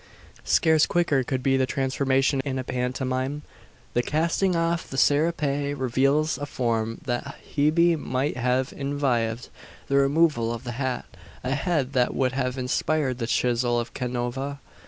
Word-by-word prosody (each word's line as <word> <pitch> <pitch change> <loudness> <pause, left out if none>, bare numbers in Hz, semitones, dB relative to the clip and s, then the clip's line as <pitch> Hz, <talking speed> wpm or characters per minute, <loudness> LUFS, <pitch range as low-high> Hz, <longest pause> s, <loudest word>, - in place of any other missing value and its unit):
Scarce 160 -2 +4
quicker 160 -6 +2
could 130 +1 -3
be 135 0 +3
the 130 -1 +1
transformation 135 0 +1
in 135 -2 -3
a 130 - -2
pantomime. 130 +3 -2 0.5
The 120 - +2
casting 170 +6 +1
off 165 0 0
the 135 - -6
serape 145 -1 +1
reveals 135 +5 +1
a 145 - -4
form 115 -2 -1
that 130 +2 -3 0.2
Hebe 165 +4 +4
might 130 +2 -1
have 125 +1 0
envied; 125 -5 -1 0.4
the 140 - +3
removal 140 -4 +3
of 115 -1 -5
the 120 - -4
hat, 130 +1 -2 0.4
a 130 +2 -1
head 140 -2 0
that 125 -2 +1
would 130 -1 +1
have 125 0 -2
inspired 130 +1 0
the 115 - -2
chisel 120 0 +1
of 120 0 -5
Canova! 125 +3 -3
135 Hz, 150 wpm, -25 LUFS, 125-145 Hz, 0.5 s, Scarce